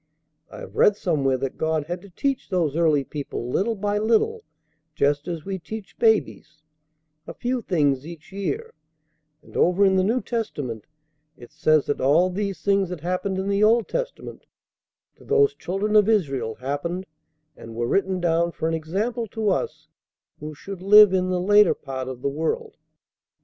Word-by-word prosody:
I - - -10
have - - -10
read 210 - +5
somewhere 140 -9 0
that 135 +1 -5
God 160 -1 0
had 175 +2 -5
to 200 - -14
teach 270 +9 -2
those 170 -7 0
early 155 -4 +3
people 135 -4 -6
little 225 - 0
by 205 0 -1
little 235 - +1 0.5
just 145 +2 +1
as 170 -3 -5
we 195 -1 -4
teach 215 +3 -9
babies, 200 -9 +1 0.6
a - - -8
few 250 0 -2
things 145 - +1
each 170 +1 -11
year; 435 - -4 0.7
and - - -18
over 180 +3 +3
in 190 -1 +3
the 185 - +3
New 225 +6 +1
Testament 145 - -4 0.5
it 120 - -14
says 155 0 +2
that 145 - -2
all 160 +7 +3
these 195 -4 -4
things 195 -2 +2
that 180 -4 -6
happened 185 +3 -2
in 190 +1 -2
the 200 +1 +1
Old 225 +1 +4
Testament - - -5 0.7
to - - -18
those 425 -1 +3
children 210 - -2
of 210 0 +5
Israel 135 - 0
happened 145 +8 -4 0.5
and 115 0 -11
were 120 +1 -1
written 190 +4 0
down 170 0 +1
for 160 - -2
an 165 - -1
example 205 +9 -2
to 215 0 -1
us 150 -4 -3 0.5
who 150 0 -7
should 195 +4 -9
live 205 0 +8
in 185 -1 +1
the 180 -1 0
later 205 +3 +5
part 130 -2 -6
of 130 -1 -7
the - - +1
world. 290 - -2
185 Hz, 175 wpm, -24 LUFS, 150-210 Hz, 0.7 s, live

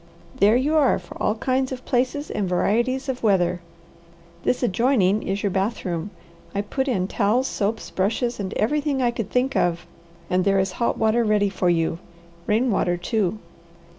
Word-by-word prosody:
"There 205 +3 +5
you 280 +5 +1
are 280 -4 +4
for - - -11
all 210 - +1
kinds 260 +3 0
of 255 -1 -6
places 260 +4 -1
and 195 -3 -2
varieties 240 +9 +1
of 260 -2 -3
weather. 180 -4 +2 0.8
This 250 - 0
adjoining 215 -2 +2
is 195 +1 -3
your 200 - +1
bathroom. 190 -2 -2 0.5
I 200 - +1
put 265 +7 -2
in 190 -8 0
towels, 225 +7 +1
soaps; 215 +2 -2
brushes, 230 +5 -1
and 195 -1 -3
everything 290 +4 0
I 240 - +2
could 230 -4 -4
think 255 +4 0
of, 175 0 +1 0.4
and 180 +1 +1
there 195 0 +2
is 190 0 +1
hot 235 +5 -1
water 220 +2 +2
ready 210 -2 +2
for 185 -2 0
you 165 -1 +1 0.5
rain 230 +4 +2
water, 175 -3 +1
too." 195 +2 -1
215 Hz, 170 wpm, -23 LUFS, 190-250 Hz, 0.8 s, There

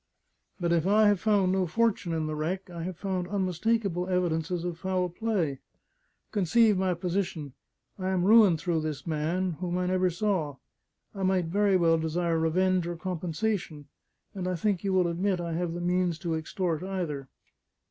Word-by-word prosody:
But 170 -1 +1
if 170 +1 +1
I 215 +2 +5
have 205 -2 +3
found 200 -3 +2
no 190 -1 +1
fortune 210 -1 +1
in 160 -1 -1
the 155 - -3
wreck, 180 +5 -3
I 170 -1 -6
have 180 0 -5
found 185 -2 -2
unmistakable 190 0 0
evidences 175 -2 0
of 175 -2 -4
foul 185 -1 -1
play. 175 - -1 0.7
Conceive 210 +2 +3
my 185 -1 +1
position: 175 -5 -3 0.5
I 185 0 -1
am 185 -2 +1
ruined 205 -6 +6
through 165 -1 0
this 155 -3 -4
man, 165 +2 -1
whom 180 -1 -2
I 180 - 0
never 185 0 +2
saw; 175 -5 -1 0.6
I 195 - -6
might 185 -2 +2
very 195 +3 +2
well 165 -2 +3
desire 165 +1 0
revenge 180 +2 +2
or 175 - -3
compensation; 175 -1 -3 0.5
and 185 -3 -4
I 185 - 0
think 190 +1 0
you 195 - 0
will 185 -2 +3
admit 180 +2 0
I 170 -1 -3
have 170 0 -2
the 175 - -4
means 180 -1 +1
to 170 -3 -2
extort 160 +1 -2
either." 175 -8 -4
180 Hz, 175 wpm, -28 LUFS, 165-190 Hz, 0.7 s, ruined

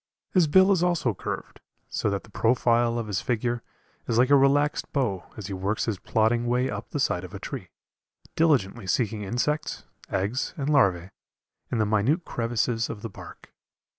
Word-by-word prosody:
His 180 -4 +4
bill 190 +6 +6
is 185 -4 +3
also 175 -10 +1
curved, - - -6 0.3
so 110 - -1
that 100 -1 -2
the 110 - -18
profile 120 +1 +2
of 115 - -2
his 100 -3 -2
figure 120 0 -1 0.5
is 115 - 0
like 125 +3 +4
a - - +8
relaxed 140 +2 +2
bow 120 - -1
as 105 - -6
he 100 - -5
works 95 +3 -1
his 105 -5 -2
plodding 115 +2 +1
way 125 +2 +1
up - - -6
the - - -3
side - - 0
of - - -7
the - - -8
tree, - - -6 0.7
diligently 120 -10 +2
seeking 110 +1 0
insects, 125 +9 -2 0.3
eggs, 100 +7 -1
and 140 -1 -2
larvæ, 95 - +3 0.6
in 120 - 0
the 110 - +2
minute 110 - +1
crevices 115 0 -1
of 105 - -7
the 115 - -4
bark. - - -12
120 Hz, 180 wpm, -26 LUFS, 105-140 Hz, 0.7 s, a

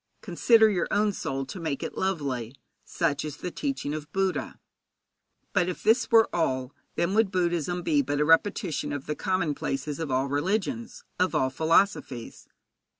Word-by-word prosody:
Consider 225 -2 +5
your 185 -5 0
own 210 0 +2
soul, 135 -6 -3
to 180 - -8
make 155 -5 -3
it - - -5
lovely. 140 -10 -2 0.3
Such 150 -5 -1
is 150 -2 -6
the 180 - -5
teaching 275 - -3
of 155 0 -6
Buddha. 190 0 -1 0.9
But 180 -3 +2
if 180 - -6
this 225 +4 +3
were 225 -2 +6
all, 130 -6 -1 0.2
then 170 +3 0
would 220 -1 +3
Buddhism 175 -2 -1
be 150 -3 +3
but 145 +2 -2
a 150 - +3
repetition 165 -2 +2
of 145 -1 -5
the 150 - -2
commonplaces 150 -6 -2
of 160 -3 -3
all 130 +1 +1
religions, 200 - -2 0.2
of 185 +1 +1
all 130 0 +2
philosophies. 160 - 0
165 Hz, 160 wpm, -27 LUFS, 145-195 Hz, 0.9 s, were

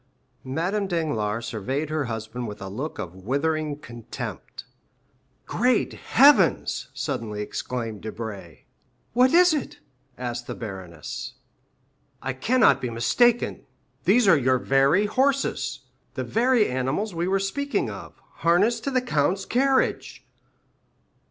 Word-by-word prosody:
Madame 175 +10 -1
Danglars 120 - -1
surveyed 135 +8 -3
her 155 -2 0
husband 115 +1 -5
with 105 0 -7
a 95 - -6
look 130 +11 -5
of 85 - -6
withering 145 +9 -1
contempt. 120 -6 -8 0.8
"Great 250 0 +1
heavens?" 280 +4 +4
suddenly 115 -7 -4
exclaimed 115 -1 -4
Debray. 105 -6 -7 0.5
"What 250 +2 +5
is 355 0 +6
it?" 295 -5 -3 0.4
asked 120 -1 -4
the - - -5
baroness. 95 -7 -7 0.8
"I 135 - -3
cannot 140 - +3
be 125 - -2
mistaken; 225 - +1 0.4
there 225 -6 +5
are - - +7
your 135 +3 +3
horses! 275 +4 0 0.3
The - - -2
very 240 -1 +2
animals 135 +11 -2
we 170 +1 -1
were 195 +1 +2
speaking 280 +9 -1
of, - - -10 0.2
harnessed 200 +8 +2
to - - +1
the 255 -2 +1
count's 185 - 0
carriage!" 265 +2 0
145 Hz, 120 wpm, -25 LUFS, -, 0.8 s, are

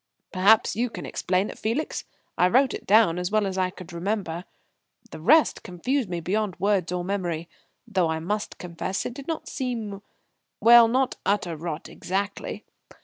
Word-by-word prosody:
"Perhaps 200 +4 +4
you 240 +3 0
can - - -7
explain 185 +3 -1
it, - - -13
Felix. 240 +8 -2 0.3
I 180 - +4
wrote 255 +7 +3
it - - -7
down, 200 -5 +5
as 180 0 -2
well 215 0 +2
as 190 -1 -3
I 185 -1 +1
could 185 -1 -11
remember. 180 -1 -3 0.7
The - - -8
rest 305 - +4
confused 225 +6 -2
me 175 -1 -2
beyond 190 +2 -2
words 195 -3 +1
or 180 -1 -2
memory; 175 -4 -2 0.4
though 185 -6 +1
I 160 - 0
must 205 +6 -3
confess 180 +2 -4
it - - -3
did 275 +2 -10
not 325 -2 -3
seem 225 -7 -4 0.6
well, 235 0 +8
not 255 +2 +1
utter 195 -5 0
rot 160 -1 -5
exactly. 200 +2 -4
200 Hz, 170 wpm, -25 LUFS, 180-225 Hz, 0.7 s, well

